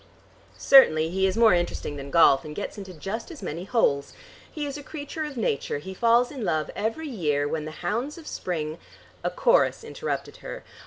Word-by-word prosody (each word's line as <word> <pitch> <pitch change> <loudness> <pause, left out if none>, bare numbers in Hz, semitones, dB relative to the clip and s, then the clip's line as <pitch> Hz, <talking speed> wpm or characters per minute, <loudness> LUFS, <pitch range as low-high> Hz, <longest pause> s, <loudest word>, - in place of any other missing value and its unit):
"Certainly 160 - +6
he 190 +1 +2
is 190 - -1
more 230 -4 +6
interesting 175 -4 -1
than 140 -1 -7
golf, 140 -4 +5
and 150 -1 -8
gets 205 - -5
into 195 -3 -8
just 195 +7 -5
as 330 -5 -10
many 170 +4 -4
holes. 140 - +1 0.4
He 300 -2 -4
is 280 -1 -4
a 295 - -6
creature 305 +1 -5
of 290 -3 -7
Nature. 145 -11 -1
He 190 +6 -7
falls 235 +4 +3
in 270 -5 -6
love 155 -5 -1
every 225 +10 -2
year, 150 - 0
when 155 0 -3
the - - -5 0.2
hounds 240 - -2
of 330 - -11
spring 160 - -4 0.2
" - - -27
A - - +1
chorus - - +2
interrupted 460 +1 -4
her. - - -8
195 Hz, 200 wpm, -26 LUFS, -, 0.4 s, Certainly